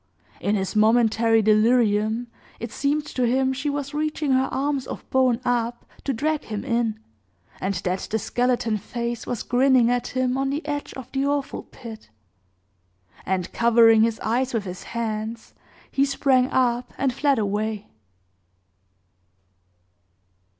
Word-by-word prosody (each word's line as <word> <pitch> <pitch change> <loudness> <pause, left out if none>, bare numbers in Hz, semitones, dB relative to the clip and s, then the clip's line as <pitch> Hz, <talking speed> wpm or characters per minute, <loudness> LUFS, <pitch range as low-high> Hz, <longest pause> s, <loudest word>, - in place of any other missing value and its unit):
In 205 - 0
his 190 0 -2
momentary 225 0 +4
delirium, 215 +1 +3 0.3
it 235 -1 -5
seemed 290 +4 0
to 255 -4 -1
him 265 +2 +2
she 275 +3 -2
was 285 0 -3
reaching 305 -1 -1
her 260 0 +2
arms 275 -1 -1
of - - -7
bone 255 -3 +3
up 240 -1 -1 0.2
to 275 - +1
drag 300 +5 -1
him 210 -2 -5
in, 230 -2 0 0.6
and 195 +1 -1
that 180 +1 -2
the 220 - 0
skeleton 240 0 0
face 235 +3 -4
was 240 - -3
grinning 250 -1 +4
at 245 0 0
him 255 0 -1
on 270 0 0
the 285 +2 -3
edge 290 -1 -3
of 260 - -9
the 270 +1 0
awful 285 -1 -1
pit. 225 - -11 1.2
And, 185 -2 -1
covering 230 -1 +5
his 225 0 +1
eyes 245 +3 0
with 220 - 0
his 185 -2 -7 0.2
hands, 220 0 -4 0.4
he 275 - +2
sprang 270 -2 +2
up, 245 -1 +1
and 270 -2 0
fled 280 +1 +2
away. 210 0 -1
240 Hz, 145 wpm, -24 LUFS, 220-265 Hz, 1.2 s, covering